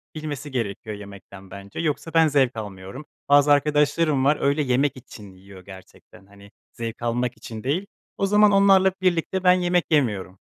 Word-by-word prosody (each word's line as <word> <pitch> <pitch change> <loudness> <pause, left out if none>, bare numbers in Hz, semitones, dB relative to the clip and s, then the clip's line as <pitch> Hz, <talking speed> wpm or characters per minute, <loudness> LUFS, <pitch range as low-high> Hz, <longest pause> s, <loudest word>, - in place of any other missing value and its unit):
bilmesi 150 -2 -6
gerekiyor 110 -3 -4
yemekten 100 -1 -13
bence, 100 0 -10
yoksa 165 0 -3
ben 165 -1 +5
zevk 135 -4 +1
almıyorum. 100 +6 -8 0.2
Bazı 145 0 +5
arkadaşlarım 145 0 +2
var 145 +2 +3
öyle, 140 +2 +1
yemek 135 +1 0
için 105 -5 -13
yiyor 95 0 -16
gerçekten 95 0 -15
hani, 100 0 -18 0.2
zevk 115 -1 -7
almak 120 0 -2
için 110 -1 -9
değil, 160 +9 -1 0.3
o 195 - 0
zaman 210 +1 +4
onlarla 195 -1 +4
birlikte 185 +1 0
ben 180 -1 +6
yemek 180 -2 +1
yemiyorum. 105 -10 0
135 Hz, 160 wpm, -23 LUFS, 100-155 Hz, 0.3 s, ben